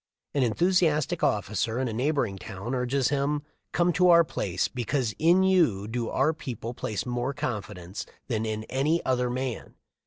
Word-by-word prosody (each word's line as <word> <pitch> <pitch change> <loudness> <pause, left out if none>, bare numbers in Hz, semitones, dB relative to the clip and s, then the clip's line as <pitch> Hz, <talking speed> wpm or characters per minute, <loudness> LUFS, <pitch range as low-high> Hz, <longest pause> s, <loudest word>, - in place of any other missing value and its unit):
An 140 - +1
enthusiastic 155 - +2
officer 105 +3 0
in 130 0 0
a 115 - -3
neighboring 120 -5 0
town 100 +7 -6
urges 130 +1 +1
him: 145 +1 0 0.3
"Come 175 0 +2
to 180 +2 +4
our 170 -1 +8
place, 95 - -1
because 125 -1 -1
in 175 +4 +5
you 160 - +3
do 115 +1 -2
our 145 +4 +2
people 120 -6 -6
place 110 -3 -3
more 125 +2 -2
confidence 105 - -5 0.2
than 110 -4 -1
in 110 -1 -2
any 140 +8 0
other 125 -1 +1
man. 130 -1 -4
125 Hz, 160 wpm, -27 LUFS, 110-150 Hz, 0.3 s, our